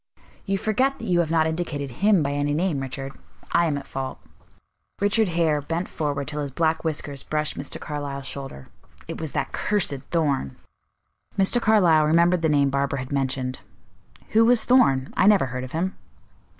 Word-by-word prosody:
"You 195 0 +1
forget 255 +7 +1
that 230 - -8
you 180 -4 +2
have 170 -3 +1
not 160 -1 +3
indicted 160 -4 -3
'him' 195 - +3
by 140 - -1
any 145 0 0
name, 165 -3 0
Richard. 135 0 -5 0.4
I 170 0 +3
am 145 -3 -1
at 140 - -7
fault." 135 -1 -5 0.8
Richard 205 +2 +2
Hare 165 -4 +1
bent 165 +5 -3
forward 145 -2 -3
till 150 0 -3
his 145 - -3
black 160 +3 0
whiskers 145 -3 -3
brushed 150 -1 -2
Mr. 140 - -5
Carlyle's 145 -2 -5
shoulder. 135 - -6 0.4
"It - - -6
was 160 -3 -5
that - - -2
cursed 205 -8 +1 0.2
Thorn." 140 - 0 0.8
Mr. 195 +5 +3
Carlyle 180 -9 +4
remembered 170 +2 +3
the 160 - +2
name 140 -2 +3
Barbara 140 0 0
had 130 +1 -6
mentioned. 130 -2 -1 0.7
"Who 225 +1 +4
was 240 0 +4
Thorn? 135 - +3
I 190 - +4
never 205 -8 +5
heard 130 0 -5
of 130 - -8
him." 180 +4 -1
155 Hz, 175 wpm, -24 LUFS, 140-180 Hz, 0.8 s, never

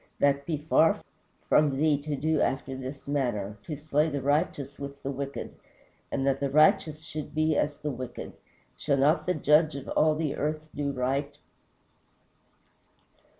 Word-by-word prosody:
that 140 0 +2
be 160 -3 0
far 155 +2 +3 0.5
from 145 -3 +3
thee 155 +1 +3
to 145 +1 -3
do 155 +2 +1
after 135 0 -1
this 135 +2 -7
manner, 105 -8 -1
to 150 - -5
slay 150 +1 +1
the 145 -1 -2
righteous 140 0 -1
with 140 0 -8
the 140 - -2
wicked: 140 0 -5 0.6
and 135 - -1
that 135 0 +2
the 140 0 0
righteous 155 +1 +3
should 155 -2 -7
be 155 0 +2
as 145 0 0
the 150 -1 -3
wicked. 125 -1 -7 0.4
Shall 140 -2 0
not 150 +7 +3
the 180 - +2
Judge 150 +1 +4
of 140 - -7
all 155 0 +3
the 155 -2 -1
earth 155 +1 -3
do 145 -1 -1
right?" 140 +2 -2
145 Hz, 160 wpm, -28 LUFS, 135-155 Hz, 0.6 s, Judge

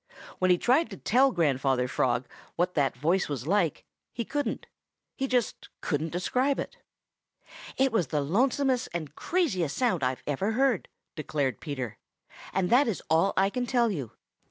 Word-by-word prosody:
When 185 - +2
he 180 - +5
tried 260 - +2
to - - -8
tell 265 +4 +3
Grandfather 135 - +1
Frog 125 -1 0 0.3
what 180 +1 0
that 140 -5 +1
voice 170 +7 +1
was 140 -3 -4
like, 175 -3 +1 0.3
he 235 - -4
couldn't. 290 +3 -2 0.5
He 270 - -2
just 250 -3 -1
couldn't 155 +2 -1
describe 250 - 0
it. - - -5 1.0
"It 265 0 +3
was 185 -9 +1
the 145 +3 0
lonesomest 255 - +1
and 155 -4 -4
craziest 190 - -1
sound 235 - +1
I've 125 0 -1
ever 190 +10 -1
heard," 255 -4 +1 0.3
declared 145 -6 -2
Peter, 130 -6 -5 0.5
"and 185 -2 0
that 255 +3 +5
is 220 - -2
all 165 +5 +3
I 195 +1 +3
can 245 +1 -2
tell 240 -2 +2
you. 140 - -5
180 Hz, 160 wpm, -28 LUFS, -, 1.0 s, he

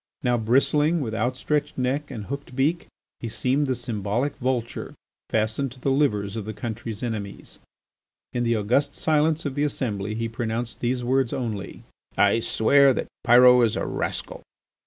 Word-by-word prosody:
Now, 125 -1 +2
bristling, 140 +8 +2
with 115 -7 -3
outstretched 130 +6 -1
neck 135 +3 -1
and 105 -3 -6
hooked 140 0 -7
beak, 150 +6 0 0.3
he 115 - -5
seemed 135 +6 0
the 130 - 0
symbolical 120 +3 -2
vulture 125 -2 -2 0.3
fastened 110 +5 0
to 130 - -17
the 135 - 0
livers 105 -8 +1
of 110 -2 -5
his 110 - -5
country's 115 -1 -5
enemies. 105 -4 -5 0.7
In 120 - 0
the 115 -1 +2
august 125 +7 +1
silence 155 +1 +1
of 140 - -2
the 145 +1 0
assembly 105 -8 -2
he 115 +1 -2
pronounced 115 +1 -3
these 125 0 -1
words 130 0 +1
only: 110 -6 -4 0.3
"I 105 +3 +4
swear 135 +4 +4
that - - -3
Pyrot 125 +1 +7
is 115 - +2
a - - -2
rascal." - - -4
120 Hz, 160 wpm, -24 LUFS, 110-140 Hz, 0.7 s, Pyrot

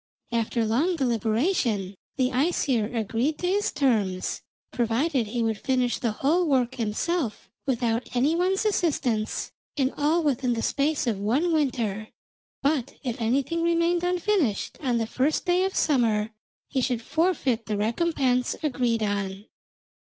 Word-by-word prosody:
After 230 0 0
long 285 +12 +1
deliberation 230 - 0 0.2
the 255 -2 +2
Æsir 255 -5 +1
agreed 230 +7 0
to 360 - -4
his 400 +3 +1
terms, 210 -9 0 0.3
provided 240 +2 0
he 235 +2 -1
would 225 -2 -1
finish 255 -2 0
the 235 -4 0
whole 320 +10 +1
work 260 -3 +2
himself 245 +4 -2 0.2
without 235 -2 0
any 280 +6 +3
one's 375 +4 +1
assistance, 280 - 0 0.3
and 265 -1 +1
all 315 +4 +2
within 265 -4 +1
the 230 - -2
space 295 +1 +1
of 220 -5 -1
one 270 - +1
winter, 230 -8 0 0.6
but 280 -3 0
if 245 -3 -3
anything 275 +8 0
remained 340 +1 +2
unfinished 355 - 0
on 250 -5 +1
the 225 - 0
first 265 +9 0
day 360 +1 +3
of 385 - -3
summer, 225 -7 +2 0.4
he 265 - -1
should 245 -2 -1
forfeit 280 -8 0
the 210 -1 -1
recompense 250 +2 +1
agreed 245 -6 0
on. 200 -1 -2
255 Hz, 140 wpm, -26 LUFS, 225-315 Hz, 0.6 s, any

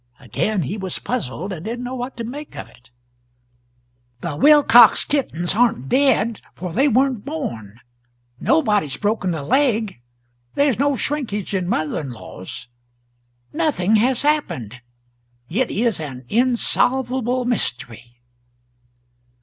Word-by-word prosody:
Again 175 - -1
he 190 +10 -4
was 190 -2 -3
puzzled, 190 - -4
and 165 -3 -7
didn't 235 +4 -4
know 250 - -5
what 250 0 -5
to 235 - -4
make 280 +6 -8
of - - -7
it. 125 - -21 1.3
"The 165 -4 -4
Wilcox 245 - +7
kittens 175 - 0
aren't 215 - +1
dead, 240 -5 +2
for 180 -2 -6
they 270 - +3
weren't 260 -3 +2
born; 120 - -6 0.6
nobody's 210 - +1
broken 205 -3 -1
a 150 - -5
leg; 220 - +1 0.5
there's 280 -5 +2
no 285 0 +2
shrinkage 230 -9 -3
in 185 -2 -1
mother 155 -4 -1
in 140 - -6
laws; 120 +2 -9 0.9
nothing 255 - +2
has 250 +4 +1
happened 125 - -1 0.7
it 240 +7 +1
is 230 -3 0
an 135 -5 -7
insolvable 250 +1 +1
mystery." 120 - -3
220 Hz, 125 wpm, -21 LUFS, 160-260 Hz, 1.3 s, Wilcox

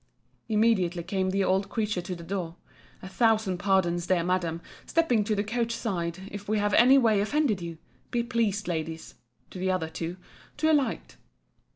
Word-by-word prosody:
Immediately 205 -6 +2
came 190 +1 -1
the 195 +1 +1
old 190 +1 +1
creature 210 -5 -1
to 180 +1 -5
the 170 - -10
door. 170 -2 -4 0.5
A - - -6
thousand 215 -3 +1
pardons, 175 -3 +1
dear 180 -2 +2
Madam, 175 -2 0 0.3
stepping 255 -10 +2
to 215 0 0
the 205 - 0
coach 230 +2 -1
side, 185 -4 -3
if 205 0 -8
we 215 - +2
have 205 0 0
any 260 +3 +7
way 220 -6 +4
offended 230 -3 +1
you—Be 165 - -6
pleased, 225 -5 -1
Ladies, 160 -1 -4 0.4
[to 185 - -8
the 190 +1 0
other 180 -4 0
two] 165 +2 -5 0.4
to 315 +1 +2
alight. 290 -4 0
195 Hz, 170 wpm, -27 LUFS, 175-225 Hz, 0.5 s, any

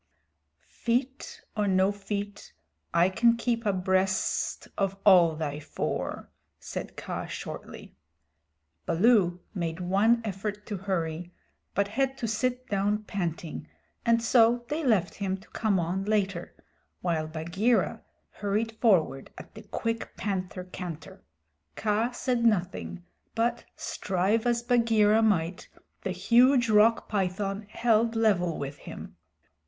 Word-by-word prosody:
"Feet 265 - -2
or 210 -1 +1
no 190 +1 +3
feet, 205 0 -5 0.4
I 170 +1 +4
can 230 +4 +3
keep 230 -1 -1
abreast 190 0 0
of 195 0 -1
all 175 -5 +7
thy 150 -2 -3
four," 150 - -4 0.3
said - - -7
Kaa - - -5
shortly. - - -8 0.9
Baloo 180 -1 +3
made 170 -3 -3
one 200 +6 +3
effort 210 +1 -4
to 205 - -4
hurry, 175 -3 -3 0.4
but 200 0 +2
had 270 +4 0
to 230 - -2
sit 250 +3 -1
down 205 +1 0
panting, 170 -6 -4 0.4
and 230 0 +3
so 235 0 +4
they 315 +2 -2
left 215 - +2
him 195 -2 -2
to 195 - -18
come 210 -4 +1
on 180 +3 -1
later, 200 -4 -1 0.5
while 165 -3 0
Bagheera 170 +9 0 0.3
hurried 210 +3 -1
forward, 160 - +2
at - - -11
the - - -10
quick 230 -1 -4
panther 185 -2 -3
canter. 180 -4 -8 0.5
Kaa 215 +2 +1
said 245 -1 -1
nothing, 185 -4 0 0.3
but, 235 +1 0
strive 195 +5 0
as 235 0 +1
Bagheera 225 -3 +4
might, 185 -5 +1 0.3
the - - -3
huge 235 +6 +4
Rock 215 +2 +4
python 195 +1 -2
held 230 0 +2
level 190 -7 +2
with 140 0 -5
him. - - -9
205 Hz, 125 wpm, -28 LUFS, 180-230 Hz, 0.9 s, all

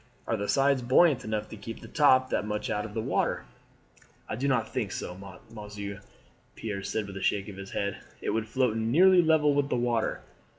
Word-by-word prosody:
Are 115 - 0
the 100 -1 -3
sides 140 -1 +3
buoyant 130 +2 +4
enough 110 -2 -3
to - - -8
keep 115 +2 -8
the - - -11
top 130 -5 +4
that - - +1
much 105 0 -3
out 105 - -1
of 105 0 -9
water?" 110 - -1 0.8
"I - - -3
do 135 +5 -1
not 115 -5 0
think 110 -7 -2
so, 90 - -5 0.4
monsieur," 105 -2 -7 0.5
Pierre 105 -3 -4
said 105 +2 -2
with 100 -1 -8
a - - -6
shake 100 -1 0
of 100 - -9
the 95 0 -9
head. 100 -1 -2 0.2
"It - - -2
would 110 -1 -1
float 125 -3 +1
nearly 170 +12 +5
level 155 -3 +4
with 140 0 +1
the - - +1
water." 120 -2 0
115 Hz, 205 wpm, -28 LUFS, 105-135 Hz, 0.8 s, nearly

